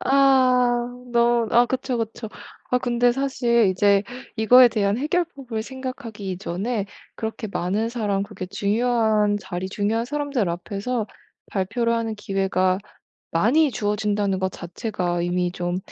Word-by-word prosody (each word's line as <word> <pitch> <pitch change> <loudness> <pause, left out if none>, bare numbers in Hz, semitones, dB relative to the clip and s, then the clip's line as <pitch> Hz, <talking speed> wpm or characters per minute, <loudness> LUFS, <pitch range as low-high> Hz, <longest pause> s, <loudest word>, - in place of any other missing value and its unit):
아 255 -3 +4 0.3
너 235 -1 +3
아 240 +1 +5
그쵸, 255 0 -2
그쵸. 225 0 -4 0.4
아 250 - +3
근데 245 0 +2
사실 240 -4 +2
이제 200 +2 +3 0.3
이거에 245 +3 +7
대한 210 -1 0
해결법을 280 -7 -2
생각하기 240 -6 -6
이전에 195 +4 -3 0.3
그렇게 220 0 -4
많은 200 +5 -1
사람 210 -5 -1
그게 200 -1 -7
중요한 210 +1 +1
자리, 190 -1 -5
중요한 210 +4 -1
사람들 280 -6 -1
앞에서 205 +6 -3 0.4
발표를 230 +5 0
하는 225 -1 -2
기회가 195 -2 0 0.5
많이 265 - +3
주어진다는 205 -3 -1
것 190 0 -1
자체가 175 -1 -3
이미 175 0 0
좀 175 0 -2
220 Hz, 285 characters per minute, -23 LUFS, 195-245 Hz, 0.5 s, 이거에